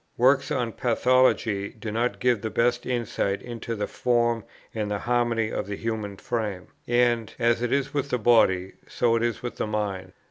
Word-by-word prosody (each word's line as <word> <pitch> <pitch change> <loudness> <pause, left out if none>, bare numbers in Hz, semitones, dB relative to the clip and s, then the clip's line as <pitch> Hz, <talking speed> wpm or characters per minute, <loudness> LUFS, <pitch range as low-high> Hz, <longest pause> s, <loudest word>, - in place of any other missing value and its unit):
Works 130 +5 +4
on 125 -6 -1
pathology 120 -4 +2
do 110 0 -5
not 120 +3 -1
give 125 -4 +2
the 110 - -3
best 120 +3 +1
insight 115 -5 -1
into 120 -1 -5
the 105 -1 -2
form 120 -2 +1 0.3
and 105 -2 -2
the 105 - -1
harmony 120 -1 0
of - - -3
the 100 - -3
human 110 -3 -4
frame; 105 -6 -3 0.2
and, 120 -2 +2
as 120 -1 +2
it 120 - -1
is 140 0 0
with 140 -1 -1
the 125 - +1
body, 95 -5 +3
so 115 -1 +1
is 115 0 0
it - - -17
with 120 - -5
the - - -1
mind. 100 -3 -3
115 Hz, 185 wpm, -25 LUFS, 105-120 Hz, 0.3 s, Works